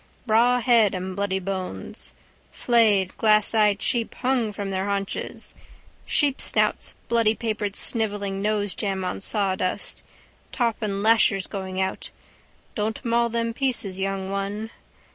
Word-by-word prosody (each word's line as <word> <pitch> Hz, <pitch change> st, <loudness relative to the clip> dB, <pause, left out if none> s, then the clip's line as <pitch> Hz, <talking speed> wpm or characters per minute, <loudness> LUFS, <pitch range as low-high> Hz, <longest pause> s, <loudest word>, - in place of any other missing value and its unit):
Rawhead 235 Hz, -2 st, +4 dB
and 185 Hz, 0 st, -4 dB
bloody 200 Hz, -1 st, 0 dB
bones. 185 Hz, -, -3 dB, 0.4 s
Flayed 210 Hz, -6 st, +3 dB
glasseyed 215 Hz, -1 st, +3 dB
sheep 235 Hz, -2 st, -1 dB
hung 250 Hz, -4 st, 0 dB
from 200 Hz, -1 st, -5 dB
their 190 Hz, 0 st, -1 dB
haunches, 200 Hz, -1 st, -3 dB, 0.5 s
sheepsnouts 285 Hz, -3 st, +2 dB
bloodypapered 220 Hz, -2 st, 0 dB
snivelling 205 Hz, -4 st, -1 dB
nosejam 205 Hz, -2 st, -1 dB
on 185 Hz, -, -3 dB
sawdust. 190 Hz, -3 st, -1 dB, 0.5 s
Top 235 Hz, -3 st, 0 dB
and 200 Hz, -2 st, -2 dB
lashers 220 Hz, -3 st, +4 dB
going 190 Hz, -2 st, -5 dB
out. 190 Hz, 0 st, -2 dB, 0.6 s
Don't 220 Hz, +3 st, -3 dB
maul 235 Hz, 0 st, +2 dB
them 230 Hz, 0 st, -1 dB
pieces, 230 Hz, -8 st, -2 dB
young 195 Hz, 0 st, -2 dB
one. 200 Hz, +3 st, -3 dB
210 Hz, 110 wpm, -24 LUFS, 195-230 Hz, 0.6 s, Rawhead